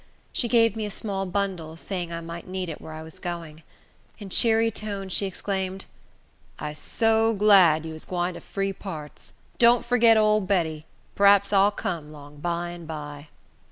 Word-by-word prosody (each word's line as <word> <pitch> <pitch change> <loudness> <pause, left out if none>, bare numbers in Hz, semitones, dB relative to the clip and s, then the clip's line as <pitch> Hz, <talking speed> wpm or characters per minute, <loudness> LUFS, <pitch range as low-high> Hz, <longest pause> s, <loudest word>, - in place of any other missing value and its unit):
She 240 - +1
gave 230 -2 +4
me 215 -1 -3
a - - -5
small 195 -2 -4
bundle, 180 -4 -3
saying 175 -1 -4
I 170 0 -4
might 170 +1 -8
need 185 -1 -4
it 155 - -7
where 160 - -9
I 155 0 -7
was 160 +4 -12
going. 170 -3 -6 0.6
In 200 -3 -9
cheery 225 +2 +3
tones, 200 -4 -5
she 200 - +1
exclaimed, 190 0 -3 0.7
"I'se 150 0 -6
so 225 +2 +2
glad 190 -7 +5
you 160 - -6
is 155 - -9
gwine 180 0 -2
to - - -9
free 195 0 -3
parts! 155 -7 -9 0.3
Don't 235 0 +5
forget 235 -2 +5
ole 215 0 +4
Betty. 165 -5 -1 0.3
P'raps 200 0 +5
I'll 195 +1 +6
come 170 -7 -4
'long 145 -1 -13
by 170 +2 -2
and 175 -2 -9
by." 150 -1 -7
185 Hz, 175 wpm, -25 LUFS, 160-205 Hz, 0.7 s, I'll